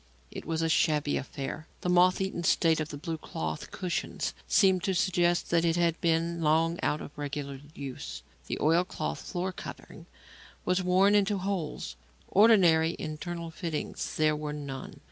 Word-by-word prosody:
It - - -7
was 165 0 0
a - - +2
shabby 150 -2 +2
affair. 140 +3 -5
The 180 - -1
moth 180 +1 +5
eaten 190 -2 -2
state 165 -1 +3
of 155 -1 -2
the 145 - -6
blue 160 +1 -4
cloth 80 - -5
cushions 180 -2 -3
seemed 190 -3 +4
to 190 - +1
suggest 175 -1 +2
that 170 -1 +3
it 165 -1 +2
had 170 -1 +1
been 165 0 +1
long 165 +2 +2
out 150 - 0
of - - -9
regular 140 -2 -5
use; 135 -2 -6 0.2
the - - -2
oil 165 +4 +4
cloth 180 - -4
floor 185 +1 -3
covering - - -10 0.6
was 180 +1 +2
worn 185 +3 +4
into 205 0 +3
holes; 185 - -3 0.3
ordinary 180 -7 +5
internal 165 +2 -5
fittings 160 -2 -4
there 155 -1 +3
were 150 0 -4
none. 140 -3 -7
165 Hz, 165 wpm, -29 LUFS, 155-180 Hz, 0.6 s, moth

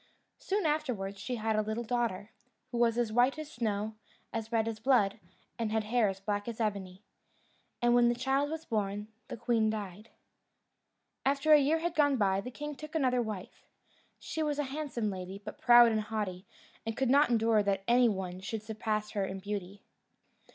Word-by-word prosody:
Soon 400 -1 -1
afterwards 250 -11 -1
she 250 +5 -3
had 220 -1 -1
a 215 - +3
little 220 +2 -3
daughter, 225 -4 -2 0.4
who 240 - -2
was 235 -1 +3
as 235 -3 +1
white 245 +5 +3
as 310 -1 -7
snow, 215 -2 -2 0.4
as 225 0 -4
red 225 -1 +1
as 225 -1 -4
blood, 220 -5 +3 0.4
and 225 -2 -1
had 220 0 +1
hair 225 +1 +2
as 190 0 -5
black 205 +1 -2
as 235 -1 -5
ebony. 200 -3 -3 0.8
And 240 0 +4
when 240 0 +5
the 240 - +1
child 270 +3 0
was 320 +1 -5
born, 210 -1 -2 0.2
the - - -6
queen 225 -1 +1
died. 210 0 -5 1.1
After 280 +3 +3
a 300 - +9
year 290 +3 +3
had 335 +1 -2
gone 285 -4 +3
by, 195 -3 +2
the 250 - -6
king 295 +4 -6
took 305 +2 -10
another 255 -5 +2
wife. 215 -5 -7 0.5
She 320 - -5
was 300 -2 0
a 295 - +1
handsome 255 -8 -2
lady, 185 0 -6
but 215 - -8
proud 240 -1 +8
and 215 -1 +1
haughty, 210 -3 -4 0.4
and 225 0 -4
could 265 -2 +1
not 285 +1 +5
endure 225 -2 +3
that 195 -1 0
any 240 0 +5
one 185 -3 -4
should 210 +3 -5
surpass 215 -1 -2
her 200 - -1
in 190 0 -5
beauty. 200 0 -6
225 Hz, 190 wpm, -31 LUFS, 205-250 Hz, 1.1 s, a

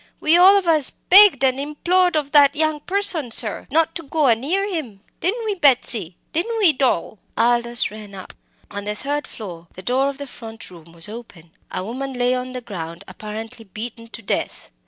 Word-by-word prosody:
"We 310 +2 +3
all 375 +3 +7
of 385 -3 -2
us 310 -4 +2
begged 380 -7 +5
and 260 0 +2
implored 350 +5 +1
of 290 -2 -1
that 285 -1 +5
young 310 0 0
person, 360 -5 0
sir, 220 -2 +2
not 320 +3 +1
to 335 - -4
go 305 0 -1
a 235 -4 +5
near 350 - -1
him! 275 - -5 0.2
Didn't 450 +6 -2
we, 425 - 0
Betsy? 245 - +2 0.2
didn't 425 +8 -1
we, 385 -8 +5
Doll?" 255 -7 -1 0.2
Aldous 235 0 +2
ran 210 -2 -11
up. 185 - -10 0.4
On 205 0 -6
the 210 0 -3
third 290 +5 -3
floor, 175 -6 -10
the 185 - -10
door 260 +6 +1
of 280 - -7
the 285 - -7
front 225 -6 -10
room 170 -2 -15
was 170 +1 0
open. 205 -7 -11 0.2
A 185 - -4
woman 265 +5 -5
lay 245 0 +1
on 255 0 -4
the 250 - -5
ground, 170 -7 -8
apparently 220 +2 -8
beaten 230 +3 -8
to 230 -1 -11
death. - - -3
255 Hz, 200 wpm, -21 LUFS, 215-315 Hz, 0.4 s, all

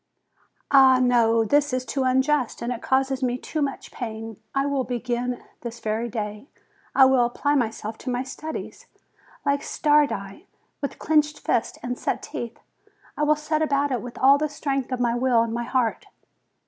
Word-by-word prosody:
Ah, 265 -2 +7
no; 230 -3 +3
this 290 +5 +2
is 255 0 -1
too 265 +3 -2
unjust, 265 0 +1
and 240 0 -3
causes 265 0 +1
me 250 -1 0
too 310 +4 -4
much 275 -2 -3
pain. 225 -2 -6 0.2
I 275 0 +2
will 280 -2 0
begin 245 0 -3 0.2
this 235 -1 -7
very 225 +2 -2
day; 210 +2 -5 0.5
I 265 - +8
will 260 -2 +4
apply 265 +4 0
myself 225 -4 -2
to - - -5
my 245 0 -1
studies, 310 +4 -7 0.6
like 280 0 +2
Stardi, 295 - +1 0.3
with 280 - -4
clenched 300 -1 +2
fists 230 - 0
and 245 0 -3
set - - -2
teeth. 235 -1 -6 0.6
I - - -4
will 300 0 +4
set 305 +1 -1
about 285 -2 +1
it 250 - -1
with 245 -1 -9
all 275 +2 +6
the 305 0 0
strength 275 -2 -2
of 255 - -1
my 240 -1 +2
will 240 -1 +3
and 230 -1 -3
my 235 0 -2
heart. 245 -3 0
255 Hz, 175 wpm, -24 LUFS, 235-280 Hz, 0.6 s, I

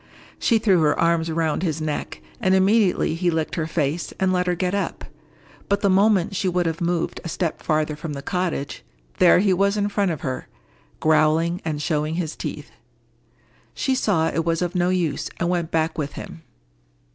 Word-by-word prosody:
She 230 - +3
threw 195 -6 +3
her 150 -1 +2
arms 165 -1 +2
round 160 -1 0
his 160 -4 -1
neck, 155 -1 -4 0.2
and 190 -5 +3
immediately 195 -2 +3
he 175 +2 0
licked 160 -2 -1
her 160 -1 -1
face, 155 0 -1
and 190 -1 +2
let 180 0 0
her 180 - +1
get 180 +1 -1
up. 200 - -2 0.6
But 200 0 +1
the 200 - +3
moment 195 -1 +3
she 190 - 0
would 180 0 0
have 165 0 -2
moved 170 -1 -1
a 170 - -5
step 165 0 -2
farther 155 -1 0
from 150 0 -6
the 140 -1 -6
cottage, 180 -6 -3 0.4
there 180 - +7
he 190 +1 +3
was 200 +3 +2
it 205 0 0
front 200 -1 +1
of 160 -4 -3
her, 130 -1 -4 0.5
growling, 160 +3 +2
and 155 -2 -2
showing 150 0 -1
his 165 -3 -3
teeth. - - -6 1.0
She 265 - 0
saw 195 -11 +1
it 165 - -1
was 165 +1 0
of 175 0 -2
no 180 -1 +1
use, 175 -6 -1
and 170 - 0
went 175 -2 -1
back 160 0 0
with 145 -1 -3
him. 165 - -9
170 Hz, 190 wpm, -23 LUFS, 160-185 Hz, 1.0 s, there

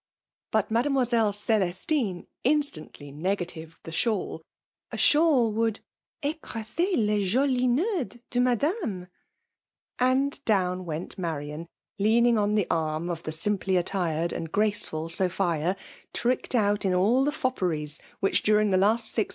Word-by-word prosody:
But 220 -1 +1
Mademoiselle 240 -3 +2
Celestine 205 - -1 0.2
instantly;, 250 - -1
negatived 165 0 -4
the 165 - -8
shawl; 200 -2 -1 0.5
a - - -5
shawl 295 -7 +4
would 225 0 -1 0.4
^ 300 +2 -1
[ - - -48
ecr^ser 235 - -2
lea 210 - +2
jolis 255 +5 +2
ncetids 295 - 0
de 245 - 0
Madame,' 245 - 0 0.9
And 265 +3 +1
down 185 -5 +1
went 165 +3 -5
Marian, 155 -1 -4 0.3
leaning 230 +2 +4
on 210 0 +1
the 205 -4 +2
arm 160 +1 -1
of 165 -1 -5
the 155 - -5
dimply*: 190 +3 0
attired 170 -2 -1
and 165 -1 -5
graceful 200 -6 +1
Sophia; 175 0 +1 0.4
tricked 250 +1 0
out 205 -2 +2
in 185 -2 +1
all 220 +9 +3
the 290 - +2
fopperies 180 - -1 0.2
which, 195 - +2
during 210 -1 +3
the. 185 - +4
iast 220 +3 +3
six. 220 - 0
210 Hz, 135 wpm, -27 LUFS, 175-245 Hz, 0.9 s, shawl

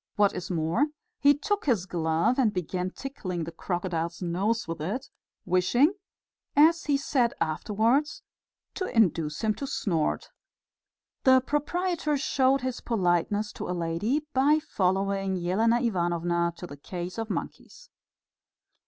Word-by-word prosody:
What 205 -1 +3
is 180 - -5
more, 170 - +1 0.3
he 285 0 +5
took 410 +4 -2
his 220 -9 +2
glove 170 +7 +1
and 235 -5 +3
began 180 0 -2
tickling 185 -8 -5
the 165 - -6
crocodile's 170 -1 -3
nose 195 +6 -1
with 165 -2 -5
it, 205 - -4 0.3
wishing, 185 - +3 0.6
as 320 +3 +5
he 285 -2 +2
said 255 -4 +1
afterwards, 220 - 0 0.5
to 375 - -3
induce 165 - +1
him 215 -1 +2
to 275 - -5
snort. 165 -11 -1 0.9
The 260 -1 +7
proprietor 300 +3 -1
showed 270 -1 +2
his 255 -1 -3
politeness 205 0 0
to - - -6
a 180 - -2
lady 205 - -1
by 285 +4 +4
following 195 -7 0
Elena 225 +6 +3
Ivanovna 175 -5 0
to - - -7
the 145 -5 -10
case 180 +6 -6
of 225 0 -3
monkeys. - - -6
205 Hz, 135 wpm, -27 LUFS, 175-265 Hz, 0.9 s, The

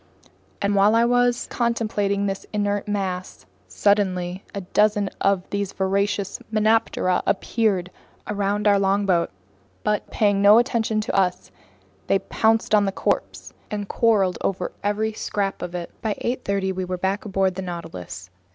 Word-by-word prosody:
While 200 +2 +4
I 230 +1 +4
was 245 0 +2
contemplating 215 -4 0
this 195 -1 -3
inert 205 -1 -1
mass, 190 - -3 0.2
suddenly 185 - +1
a 200 - -5
dozen 205 +2 +1
of 195 -2 +1
these 200 -1 -2
voracious 200 +1 -1
melanoptera 215 -4 +2
appeared 195 -3 0 0.3
around 205 0 -1
our 200 -1 +5
longboat; 195 -3 +2 0.5
but, 210 -1 -1
paying 205 -3 +2
no 205 +2 +8
attention 230 -3 +1
to 215 - -3
us, 185 -2 0 0.6
they 195 - +4
pounced 220 +3 +1
on 205 -1 +5
the 195 - 0
corpse - - -2 0.2
and 205 -1 -4
quarreled 205 -6 +2
over 185 -2 -2
every 215 +2 0
scrap 200 -2 -2
of 180 0 -5
it. 175 -1 -5
By 220 -2 -1
8:30 200 -6 -2
we 185 0 -3
were 180 0 -3
back 190 +3 -1
on 210 - -7
board 190 -1 +2
the 190 - -5
Nautilus. 165 - -7
200 Hz, 145 wpm, -23 LUFS, 190-210 Hz, 0.6 s, no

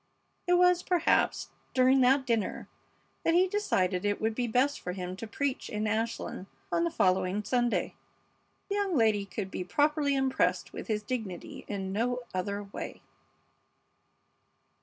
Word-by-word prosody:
It 355 - +4
was, 360 0 +5
perhaps, 355 -3 +2 0.3
during 260 +1 +5
that 265 +2 +4
dinner 230 -4 -1 0.6
that 330 - +3
he 365 +2 +5
decided 190 - 0
it 205 0 0
would 220 +1 0
be 245 +2 -1
best 260 +5 +2
for 180 - -4
him 180 -1 -5
to 225 - -6
preach 275 +4 -2
in 210 0 -2
Ashland 220 -3 -2 0.2
on 170 0 +2
the - - +1
following 185 +3 +1
Sunday. 240 +2 0 0.8
The - - -1
young 390 -5 +1
lady 215 -3 +2
could 195 -1 -5
be - - -3
properly 290 - +2
impressed 265 -1 +1
with - - -7
his 210 -2 -1
dignity 215 -7 -5
in 195 -2 -3
no 245 +4 0
other 200 +2 -2
way. 200 - -8
225 Hz, 150 wpm, -30 LUFS, 200-270 Hz, 0.8 s, was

